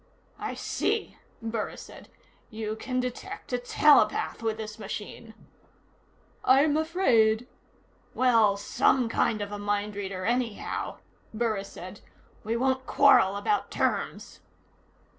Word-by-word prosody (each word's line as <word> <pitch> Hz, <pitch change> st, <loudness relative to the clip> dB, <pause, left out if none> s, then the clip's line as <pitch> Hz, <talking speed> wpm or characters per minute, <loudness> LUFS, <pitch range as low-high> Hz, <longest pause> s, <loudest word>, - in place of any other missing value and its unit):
"I -, -, -4 dB
see," -, -, -2 dB, 0.2 s
Burris 225 Hz, -1 st, -4 dB
said. -, -, -13 dB, 0.4 s
"You 220 Hz, -1 st, -4 dB
can 255 Hz, +3 st, -3 dB
detect 250 Hz, -, -5 dB
a 245 Hz, -, +1 dB
telepath 245 Hz, -3 st, +3 dB
with 220 Hz, -1 st, -1 dB
this 215 Hz, 0 st, -7 dB
machine." 215 Hz, +2 st, -7 dB, 1.1 s
"I'm 280 Hz, +3 st, +4 dB
afraid 250 Hz, -9 st, +2 dB, 0.3 s
" -, -, -36 dB
"Well, 225 Hz, -5 st, +4 dB
some 245 Hz, +4 st, +2 dB
kind 220 Hz, -1 st, +1 dB
of 205 Hz, -, -7 dB
a 205 Hz, -, -5 dB
mind 205 Hz, 0 st, -2 dB
reader 190 Hz, -2 st, -4 dB
anyhow," 240 Hz, -2 st, -2 dB, 0.4 s
Burris 215 Hz, -4 st, -1 dB
said. 185 Hz, +2 st, -10 dB, 0.4 s
"We 225 Hz, +2 st, -1 dB
won't 260 Hz, +1 st, 0 dB
quarrel 200 Hz, -8 st, +5 dB
about 405 Hz, -, 0 dB
terms." -, -, -2 dB
225 Hz, 120 wpm, -27 LUFS, 210-255 Hz, 1.1 s, quarrel